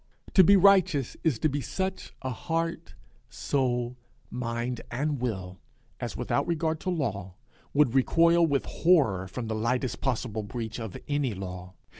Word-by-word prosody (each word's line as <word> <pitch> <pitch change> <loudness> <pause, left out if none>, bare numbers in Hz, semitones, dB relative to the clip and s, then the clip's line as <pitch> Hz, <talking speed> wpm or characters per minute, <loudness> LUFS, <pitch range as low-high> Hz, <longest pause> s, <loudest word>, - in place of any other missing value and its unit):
To 190 - +8
be 200 +3 +7
righteous 185 - +4
is 155 -8 +2
to 155 - +1
be 145 -1 -2
such 190 +6 -3
a 130 - -2
heart, 165 +6 -3 0.3
soul, 125 -2 -1 0.3
mind, 120 0 -3
and 140 +3 -1
will, 95 -6 -4 0.4
as, - - -4
without - - 0
regard 160 -1 0
to 185 - -3
law, 100 - -2 0.4
would 145 -5 +4
recoil 170 +5 +4
with 140 -3 0
horror 130 - +2
from 115 +5 -5
the 110 - -2
lightest 120 +4 -1
possible 120 -4 -1
breach 110 +1 -5
of 110 -5 -6
any 145 -6 0
law. 90 -1 -7
130 Hz, 150 wpm, -28 LUFS, 110-160 Hz, 0.4 s, To